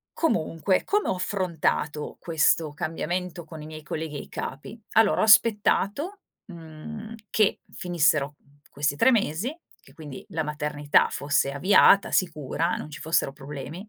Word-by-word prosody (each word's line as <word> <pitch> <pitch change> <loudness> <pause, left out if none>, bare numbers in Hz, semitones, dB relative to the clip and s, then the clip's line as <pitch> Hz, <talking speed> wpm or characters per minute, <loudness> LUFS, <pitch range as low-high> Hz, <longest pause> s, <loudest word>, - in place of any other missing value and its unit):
Comunque, 185 - 0
come 415 0 0
ho - - +1
affrontato 170 -5 -2
questo 160 -1 +2
cambiamento 175 +3 -4
con 160 -1 -10
i - - -9
miei 155 0 -9
colleghi 155 0 -5
e - - -5
i - - -14
capi? 150 - -7
Allora, 220 -2 +4
ho - - +4
aspettato, 220 - +3 0.3
mhmm, 180 +6 -9 0.2
che 215 -2 +2
finissero 155 -5 +1 0.3
questi 145 0 -1
3 260 - +5
mesi, 225 - 0 0.2
che 135 - -20
quindi 145 -4 -10
la 160 - -2
maternità 150 -1 +1
fosse 140 -1 0
avviata, 190 +6 +5
sicura, 165 -1 0
non 150 - -7
ci 140 - -9
fossero 160 -3 0
problemi. 150 +6 -8
160 Hz, 145 wpm, -25 LUFS, 150-200 Hz, 0.3 s, 3